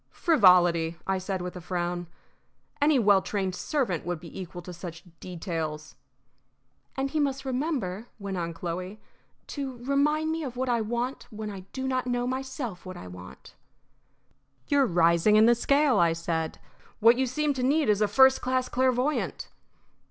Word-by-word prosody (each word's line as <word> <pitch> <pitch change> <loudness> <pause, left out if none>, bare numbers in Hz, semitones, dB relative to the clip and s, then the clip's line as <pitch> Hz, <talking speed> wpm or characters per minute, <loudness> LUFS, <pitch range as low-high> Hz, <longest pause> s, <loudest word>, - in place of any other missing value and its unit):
"Frivolity," 175 - +4
I 190 0 0
said, 185 -1 -3
with 180 0 -6
a 180 - -7
frown. 175 0 -3 0.7
"Any 295 0 +4
well 205 -5 +5
trained 190 -1 -2
servant 230 - -1
would 175 -1 -3
be 170 +3 -9
equal 175 -1 -8
to 180 - -8
such 170 -1 -8 0.2
details." 160 -4 -5 1.0
"And 270 0 -1
he 315 - 0
must 275 -2 -1
remember," 250 - -2
went 200 -2 -5
on 170 -2 -2
Chloe, 180 +4 -5 0.5
to 270 -3 -5
remind 300 +3 +1
me 325 0 -2
of 250 -3 -6
what 260 0 -1
I 235 -2 +2
want 240 +4 -3
when 215 -2 -6
I 190 -2 -9
do 265 0 -4
not 255 -1 -1
know, 245 0 0
myself, 260 -6 -4
what 185 -1 -8
I - - -9
want." 90 0 -12 1.1
"You're 280 -2 +3
rising 170 +3 +4
in 215 +1 +7
the 240 - +6
scale," 280 +3 +3
I 170 -1 +4
said. 165 -1 -3 0.4
"What 230 +2 +6
you 265 - +2
seem 295 +4 0
to 260 - -4
need 290 +4 +2
is 210 -1 +2
a 210 - +4
first 265 +5 +5
class 255 0 0
clairvoyant." 255 +3 0
215 Hz, 165 wpm, -27 LUFS, 175-265 Hz, 1.1 s, in